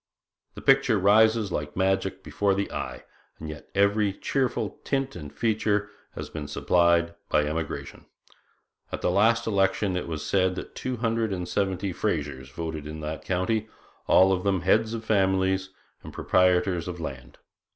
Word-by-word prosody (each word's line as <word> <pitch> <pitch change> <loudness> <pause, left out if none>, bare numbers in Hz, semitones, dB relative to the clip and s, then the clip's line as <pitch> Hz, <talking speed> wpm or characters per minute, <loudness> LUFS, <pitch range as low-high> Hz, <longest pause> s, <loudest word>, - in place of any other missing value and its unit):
The - - -8
picture 135 -4 +4
rises 110 +1 +4
like 75 -2 -3
magic 95 0 0
before 100 -1 0
the 100 0 -2
eye, - - -5 0.3
and 80 - -7
yet 75 -1 -9
every 100 +1 +3
cheerful 130 +4 -2
tint 135 -1 -1
and 75 -1 -8
feature 105 -2 0 0.2
has - - -5
been 75 -2 -6
supplied 85 +4 +2 0.2
by 75 - +3
emigration. 80 +2 -4 0.8
At - - -4
the - - +1
last 115 +5 +3
election 95 -2 +1
it 90 - -3
was 80 -3 -4
said 95 -1 +2
that - - -7
two 130 -1 -4
hundred 115 -1 0
and 90 -2 -3
seventy 95 0 -1
Frasers 70 -10 -2
voted 80 -1 -5
in 80 +1 -7
that 75 +1 -5
county 100 +4 0 0.4
all 95 +1 +6
of 90 -1 -1
them 95 -3 +1
heads 110 +5 +2
of 110 -1 -6
families 95 -2 +2 0.3
and - - -10
proprietors 90 -1 +2
of 90 -1 -5
land. 65 -6 -7
95 Hz, 160 wpm, -26 LUFS, 85-105 Hz, 0.8 s, all